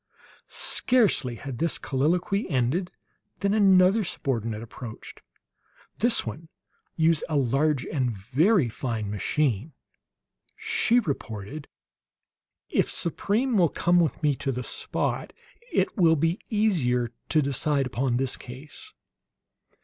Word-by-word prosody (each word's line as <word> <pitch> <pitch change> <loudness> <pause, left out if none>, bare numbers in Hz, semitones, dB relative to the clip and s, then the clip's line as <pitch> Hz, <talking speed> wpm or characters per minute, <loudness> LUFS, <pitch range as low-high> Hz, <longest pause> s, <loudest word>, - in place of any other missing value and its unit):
Scarcely 210 - +2
had 130 0 -7
this 165 0 0
colloquy 175 - 0
ended 145 +7 0 0.5
than 200 0 +1
another 195 0 +5
subordinate 115 - -3
approached. 115 0 -10 0.8
This 235 +1 +3
one 155 +9 -7 0.5
used 160 -1 +2
a 155 - -1
large 140 +1 +1
and 130 -5 -1
very 130 - +2
fine 115 -3 -4
machine. 130 +4 -1 0.8
She 435 - +2
reported: 140 - -5 1.0
"If - - +1
Supreme 220 +8 0
will 170 -3 +4
come 175 +4 +2
with 165 -1 0
me 145 -2 +3
to 135 - -2
the 125 0 -4
spot, - - -3 0.4
it - - +1
will 170 -6 +4
be 165 +5 0
easier 140 - +1 0.2
to 155 -2 +3
decide 140 +1 0
upon 125 -1 -1
this 135 0 -1
case." 145 - -11
150 Hz, 115 wpm, -26 LUFS, 125-185 Hz, 1.0 s, another